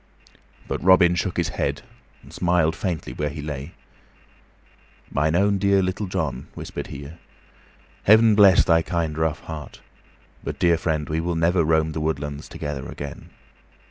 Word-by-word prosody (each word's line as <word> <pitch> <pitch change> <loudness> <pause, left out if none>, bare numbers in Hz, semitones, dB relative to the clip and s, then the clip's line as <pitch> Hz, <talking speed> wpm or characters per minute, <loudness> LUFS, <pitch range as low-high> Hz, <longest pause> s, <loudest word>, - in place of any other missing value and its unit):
But - - -3
Robin 90 -1 +6
shook 90 - -2
his - - 0
head - - -2 0.4
and - - -15
smiled 90 -2 +1
faintly 90 -5 -3
where 75 0 -2
he 75 +1 -8
lay. 75 +1 -6 1.4
"Mine 80 +3 +1
own 100 +2 +2
dear 100 -1 +3
Little 95 +2 -2
John," - - -3
whispered - - -6
he, 70 +1 -8 1.0
"Heaven 110 +1 +6
bless 100 -3 +6
thy 85 -2 +4
kind, 80 -2 -2
rough 80 0 -1
heart. 80 -2 -8 0.6
But, - - -5
dear 85 -2 +3
friend, 80 -3 -1
we 80 +1 -1
will 85 +1 -2
never 85 +1 +2
roam 80 0 +2
the 80 0 -4
woodlands 75 -2 -3
together 75 -2 -5
again." 70 -1 -8
80 Hz, 150 wpm, -23 LUFS, 75-90 Hz, 1.4 s, Robin